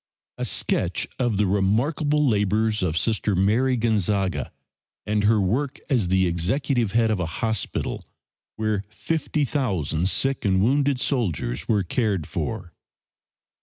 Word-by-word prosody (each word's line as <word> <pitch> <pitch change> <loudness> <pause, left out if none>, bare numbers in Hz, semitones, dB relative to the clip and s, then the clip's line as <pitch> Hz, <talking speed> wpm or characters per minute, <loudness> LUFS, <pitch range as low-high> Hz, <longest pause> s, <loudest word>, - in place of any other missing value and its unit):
A - - -1
sketch - - -1
of 120 -5 +1
the 105 - +3
remarkable 135 - +1
labors 105 0 +1
of 85 -3 0
Sister 105 +2 0
Mary 115 +8 +2
Gonzaga 100 - 0 0.5
and 105 0 0
her 110 0 +4
work 125 +9 0
as 115 -9 +2
the 95 +1 +3
executive 110 - 0
head 115 -1 +3
of 105 - 0
a 85 - -1
hospital 110 +5 -2 0.5
where 110 -2 -1
50,000 120 - -1
sick 135 +4 0
and 95 -2 +2
wounded 135 +5 +2
soldiers 95 - -1
were 105 -3 +2
cared 100 - -1
for. 95 - -4
105 Hz, 130 wpm, -24 LUFS, 95-125 Hz, 0.5 s, her